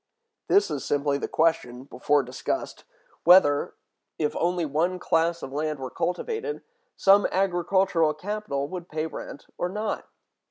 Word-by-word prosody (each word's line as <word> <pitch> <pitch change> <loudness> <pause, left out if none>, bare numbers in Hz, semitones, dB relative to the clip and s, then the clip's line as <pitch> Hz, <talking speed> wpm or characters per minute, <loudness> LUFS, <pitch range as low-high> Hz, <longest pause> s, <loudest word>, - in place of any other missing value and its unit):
This 405 +1 +3
is - - -3
simply 145 -1 0
the - - -3
question, 145 -6 0
before 140 +2 +1
discussed, 125 +1 -4 0.4
whether, 155 -5 +5 0.4
if 150 -2 -1
only 175 0 0
one 165 +5 0
class 170 -1 0
of 135 - -7
land 155 +1 -2
were 130 -1 -6
cultivated, 445 - -3 0.3
some 200 +1 +5
agricultural 180 -3 +1
capital 185 -6 -3
would 175 +1 -7
pay 155 0 -2
rent 155 -2 -8
or 175 - -1
not. 210 +2 -3
165 Hz, 135 wpm, -26 LUFS, 145-185 Hz, 0.4 s, whether